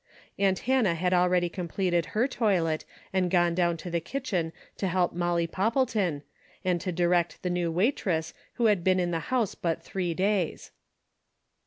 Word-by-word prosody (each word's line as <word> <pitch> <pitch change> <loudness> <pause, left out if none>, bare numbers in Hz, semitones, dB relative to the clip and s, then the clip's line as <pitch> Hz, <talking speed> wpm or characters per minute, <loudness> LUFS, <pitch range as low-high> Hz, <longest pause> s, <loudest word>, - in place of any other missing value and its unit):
Aunt 195 -1 +3
Hannah 245 -9 +3
had 180 +2 0
already 180 0 +3
completed 175 -1 -1
her 240 +4 +4
toilet 185 - 0 0.3
and 185 -2 +2
gone 175 -1 +3
down 170 -1 +1
to 175 +2 -7
the 170 - +1
kitchen 185 - -2 0.3
to 195 - -1
help 180 0 +1
Molly 175 -1 0
Poppleton, 200 - 0 0.4
and 180 -2 +1
to 185 - -2
direct 175 0 +1
the 180 - 0
new 175 -1 0
waitress 180 - 0 0.2
who 240 - 0
had 205 -5 +3
been 185 0 +3
in 175 -1 0
the 165 - 0
house 245 -6 +1
but 165 -2 -2
three 180 -3 -2
days. 190 -2 0
180 Hz, 165 wpm, -28 LUFS, 170-195 Hz, 0.4 s, her